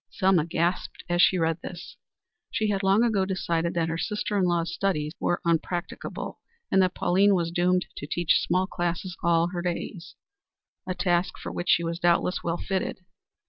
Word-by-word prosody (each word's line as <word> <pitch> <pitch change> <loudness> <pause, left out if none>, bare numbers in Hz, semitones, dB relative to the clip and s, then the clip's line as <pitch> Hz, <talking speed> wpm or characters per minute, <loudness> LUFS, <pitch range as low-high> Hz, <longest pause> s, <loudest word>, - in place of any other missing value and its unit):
Selma 190 -5 +3
gasped 170 +2 -1
as 175 0 +2
she 185 - +5
read 165 0 0
this. 180 -1 -8 0.5
She 215 -1 0
had 195 -1 0
long 195 +3 +4
ago 215 -5 +2
decided 170 -3 -1
that 165 -1 +1
her 165 0 -2
sister 210 +1 -2
in 195 -2 +3
law's 170 -1 0
studies 160 -6 -1
were 175 - 0
unpractical, 170 +1 -2 0.3
and 195 - +5
that 185 -1 +1
Pauline 195 +3 +3
was 170 -2 0
doomed 180 +1 +2
to 145 - -6
teach 170 +1 +2
small 185 +2 +1
classes 175 0 -3
all 170 0 +3
her 175 -1 -4
days, 175 -2 -4 0.7
a 185 - -2
task 180 0 0
for - - -6
which 175 - -4
she 170 - +4
was 170 0 -3
doubtless 175 +1 +2
well 170 0 -1
fitted. 190 0 -3
175 Hz, 180 wpm, -26 LUFS, 170-190 Hz, 0.7 s, she